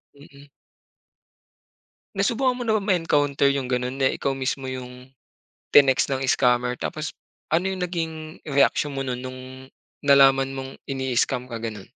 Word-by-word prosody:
Mm. 140 0 -17 1.7
Nasubukan 245 +6 +1
mo 245 - -4
na 220 - +2
bang 210 -2 -1
ma-encounter 145 -6 +2
yung 130 -2 -3
ganon 125 +2 -2
na 135 - +4
ikaw 140 - -2
mismo 135 0 -3
yung, 130 0 -8 0.6
tinext 135 -1 +5
ng 135 - -1
scammer 125 0 +2
tapos, 155 -2 -4 0.4
ano 175 +3 +2
yung 190 - -5
naging 160 -3 -5
reaksyon 140 +1 +2
mo - - -2
nun 125 -1 -3
nung, 130 0 -7 0.6
nalaman 135 -1 +5
mong 135 0 -6 0.2
ini-scam 130 -2 -1
ka 115 -2 -5
gano'n? 110 -3 -6
135 Hz, 140 wpm, -24 LUFS, 130-155 Hz, 1.7 s, tinext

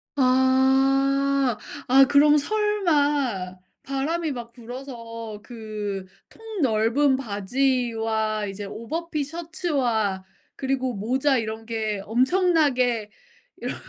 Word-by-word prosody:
아. 270 0 +3 0.3
아 270 +2 +7
그럼 295 +2 +5
설마 290 - 0 0.3
바람이 300 +4 -2
막 235 -2 -7
불어서 230 -3 -8
그 210 -4 -5 0.2
통 445 -5 -7
넓은 255 +4 +3
바지와 225 -2 -1
이제 200 +1 -6
오버핏 300 +7 -4
셔츠와 275 - -1 0.3
그리고 260 -2 -1
모자 260 +6 +1
이런 220 0 -4
게 215 -3 -2
엄청나게 255 - +2 0.5
이런 - - -4
260 Hz, 180 characters per minute, -24 LUFS, 220-285 Hz, 0.5 s, 아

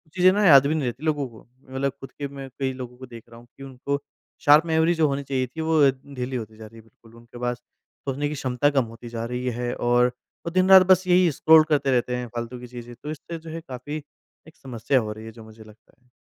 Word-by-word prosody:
चीज़ें 185 0 +5
ना 205 +1 +1
याद 140 -5 +8
भी 155 - 0
नहीं 155 - -1
रहती 125 +5 -5
लोगों 150 -3 0
को। 110 -2 -16 0.2
मैं 130 - -16
मतलब 140 +1 0
खुद 135 - -10
के 145 - -6
में 135 -1 -9
कई 135 -1 0
लोगों 125 -1 -8
को 130 - -10
देख 115 -3 -12
रहा 115 0 -13
हूँ 120 - -18
कि 135 - -10
उनको 135 +2 -4 0.4
शार्प 150 +3 +7
मेमोरी 160 +1 +2
जो 160 -2 +2
होनी 140 0 -2
चाहिए 130 -2 -2
थी, 160 +6 -7
वो 160 -1 +2
ढीली 130 -1 -7
होती 110 -2 -6
जा 110 - -10
रही 110 +1 -15
है। - - -12
बिल्कुल, 115 +1 -22
उनके 120 +1 -14
पास 120 0 -2 0.5
सोचने 140 +2 -1
की 150 - -4
क्षमता 130 +1 0
कम 135 -3 +2
होती 115 +1 -11
जा 115 -1 -4
रही 125 +1 -4
है 120 0 -2
और 120 0 +3 0.4
वो 170 - -3
दिन-रात 185 +1 +7
बस 185 0 +5
यही 180 -1 +4
स्क्रॉल 155 +3 +6
करते 140 -3 +2
रहते 125 0 +1
हैं, 125 0 -4
फ़ालतू 120 +1 -6
की 125 - -10
चीज़ें। 120 0 -10
तो 150 - -4
इससे 160 +2 -7
जो 160 0 -11
है, 165 +1 -6
काफ़ी 145 +1 -7 0.5
एक 160 - -16
समस्या 125 +1 -1
हो 110 -2 -4
रही 110 +1 -11
है, 115 - -8
जो 115 0 -13
मुझे 110 0 -14
लगता 110 +1 -20
है। 125 - -33
130 Hz, 260 wpm, -24 LUFS, 120-150 Hz, 0.5 s, याद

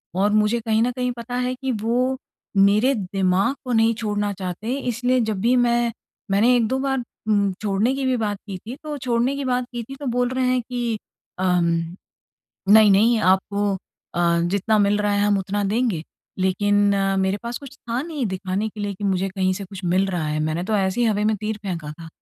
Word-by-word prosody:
और 200 +3 +2
मुझे 215 +2 +3
कहीं 220 -1 +1
न 245 - +1
कहीं 250 0 -2
पता 235 +1 -5
है 250 0 0
कि 265 0 -3
वो 250 +3 +1 0.4
मेरे 210 +7 +5
दिमाग 190 +3 +1
को 250 - -2
नहीं 225 0 +4
छोड़ना 205 -2 -1
चाहते 185 +3 -5
हैं 270 +3 -1
इसलिए 250 +1 +1
जब 205 - -2
भी 240 +4 +3
मैं 240 -1 +2 0.4
मैंने 230 +6 +4
1-2 245 +3 +1
बार 270 0 0 0.3
म 200 -2 +2
छोड़ने 210 +5 +1
की 270 -1 -2
भी 260 - +2
बात 205 -2 -1
की 195 -2 -5
थी 225 +7 -8
तो 300 -1 -4
छोड़ने 250 0 0
की 280 - -3
बात 250 -1 0
की 240 - -3
थी 270 +4 -9
तो 280 +1 -8
बोल 245 0 +1
रहे 255 0 0
हैं 255 -1 +2
कि 240 -2 -3 0.4
अम, 180 -2 +2 1.0
"नहीं-नहीं 215 +2 +6
आपको 200 +2 +2 0.5
अ, 170 -1 +2
जितना 200 +2 +2
मिल 205 0 +3
रहा 205 0 +1
है 205 - +1
हम 205 -1 +3
उतना 200 +2 -2
देंगे।" 205 -4 0 0.4
लेकिन 205 +2 +2
अ, 195 0 +1
मेरे 190 +1 +1
पास 235 +1 -3
कुछ 275 -1 -12
था 240 0 -3
नहीं 300 -4 -3
दिखाने 190 +2 -2
के 210 - -12
लिए 205 -1 -2
कि 200 - -9
मुझे 195 -1 0
कहीं 185 -1 0
से 200 - -5
कुछ 190 0 -10
मिल 185 +3 +2
रहा 175 -4 -2
है, 150 0 -1
मैंने 155 +3 -1
तो 215 +3 -2
ऐसी 195 +3 +1
ही 235 - +3
हवा 210 -1 +1
में 215 0 +2
तीर 215 +1 -3
फेंका 170 -6 -4
था। 165 +2 -10
210 Hz, 215 wpm, -22 LUFS, 195-245 Hz, 1.0 s, नहीं-नहीं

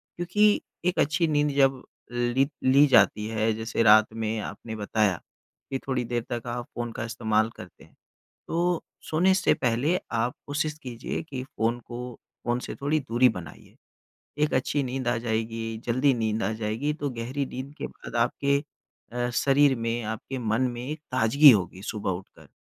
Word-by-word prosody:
क्योंकि 205 +5 +3 0.2
एक 180 - +1
अच्छी 160 +3 +2
नींद 150 -1 +2
जब 135 -2 +4 0.3
ली 120 +3 +1 0.2
ली 140 +3 +6
जाती 105 -5 +4
है, 110 0 0
जैसे 110 +1 -1
रात 110 0 +6
में 110 0 -2
आपने 110 +1 -6
बताया 105 -3 0 0.5
कि 135 - -1
थोड़ी 130 -2 0
देर 120 0 -2
तक 120 0 -3
आप 120 0 -3
फ़ोन 120 -1 -3
का - - -5
इस्तेमाल 110 -1 +1
करते - - -12
हैं। - - -21 0.5
तो 175 0 0 0.3
सोने 180 +4 +4
से 190 - +3
पहले 130 +8 +1
आप 115 +2 0
कोशिश 150 +1 -2
कीजिए 120 -2 -4
कि 130 -2 -4
फ़ोन 120 -2 -1
को 125 0 -7 0.3
फ़ोन 120 +1 +1
से - - -6
थोड़ी 150 +2 +1
दूरी 125 -1 +3
बनाइए। 85 - -13 0.7
एक 150 - 0
अच्छी 135 +2 +1
नींद 130 -1 -3
आ 120 -1 +2
जाएगी, 115 0 -2
जल्दी 130 +4 +3
नींद 110 -2 -1
आ - - 0
जाएगी 110 +7 -2
तो 145 -2 -3
गहरी 130 +4 -3
नींद 130 +3 -7
के - - -4
बाद - - -11
आपके 140 +3 0 0.5
अ, 120 0 -1
शरीर 140 +1 +4
में, 115 +1 -2
आपके 110 +5 -5
मन 115 0 0
में 120 0 -6
एक 155 +1 -4
ताज़गी 130 +4 +7
होगी 95 -3 0
सुबह 105 -3 -3
उठकर। 90 +2 -9
120 Hz, 170 wpm, -26 LUFS, 115-140 Hz, 0.7 s, ताज़गी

